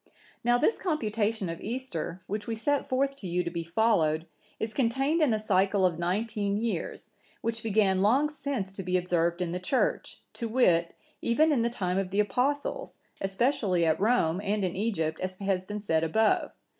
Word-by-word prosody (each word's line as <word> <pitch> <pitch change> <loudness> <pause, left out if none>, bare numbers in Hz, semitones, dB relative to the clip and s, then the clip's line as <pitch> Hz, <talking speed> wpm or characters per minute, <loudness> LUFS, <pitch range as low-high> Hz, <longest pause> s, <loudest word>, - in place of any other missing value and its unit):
"Now 240 +1 +4
this 310 - +2
computation 220 - -1
of 165 0 -5
Easter, 200 -7 -4
which 205 +2 -4
we 230 - -2
set 285 +6 0
forth 275 +2 +1
to 195 - -7
you 180 +1 0
to 170 - -4
be 170 -1 -3
followed, 165 -4 +2 0.3
is 220 0 -3
contained 270 +7 +1
in 295 -5 +4
a 215 - +1
cycle 195 -2 +2
of 170 -2 0
nineteen 205 +3 -1
years, 230 +1 -3 0.3
which 230 0 -2
began 200 -4 +2
long 255 +9 +4
since 280 -9 -4
to 195 - -6
be 185 0 +1
observed 175 -1 0
in 170 - -3
the 180 - -2
Church, 220 +8 -1
to 235 - -4
wit, 175 -8 +2 0.3
even 310 +7 +3
in 270 -6 +2
the 235 - +1
time 185 -5 -1
of 195 -1 -2
the 200 +2 -1
Apostles, 255 +8 -1 0.2
especially 195 -3 +1
at 160 +2 +1
Rome 200 -6 +2
and 205 0 0
in 180 -2 -1
Egypt, 165 -7 -1
as 185 0 -3
has 190 -1 -1
been 210 +2 -4
said 165 -6 0
above. 215 +7 +2
205 Hz, 185 wpm, -28 LUFS, 180-235 Hz, 0.3 s, Now